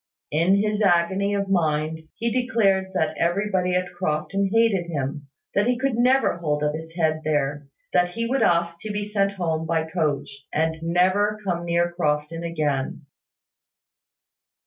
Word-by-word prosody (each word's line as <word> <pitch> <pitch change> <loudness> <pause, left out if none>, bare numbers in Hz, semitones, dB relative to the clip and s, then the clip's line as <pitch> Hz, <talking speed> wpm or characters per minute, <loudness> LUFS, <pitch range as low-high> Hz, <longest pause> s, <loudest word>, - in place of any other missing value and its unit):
In 170 +6 +3
his 210 +1 0
agony 195 +2 +2
of 200 0 -1
mind 160 -3 0
he 235 0 -1
declared 220 -6 +2
that 160 -4 0
everybody 180 +1 +1
at 180 0 -1
Crofton 180 +3 -1
hated 225 -6 +2
him, 145 -2 -4 0.3
that 205 +3 +2
he 245 0 +2
could 270 0 0
never 250 -1 +3
hold 150 -3 -1
up 150 0 +1
his 160 +1 -7
head 155 -2 +1
there, 145 -1 -1 0.3
that 180 -1 +3
he 230 +6 -3
would 260 +3 0
ask 170 0 +2
to 215 +4 -5
be 205 0 -2
sent 200 -1 0
home 160 -4 -2
by 160 -1 +1
the 160 - -11
coach, 145 -4 -2
and 160 +1 0
never 185 +5 +2
come 175 -2 -1
near 170 0 +1
Crofton 155 -1 -1
again. 150 -4 -2
175 Hz, 160 wpm, -24 LUFS, 155-200 Hz, 0.3 s, In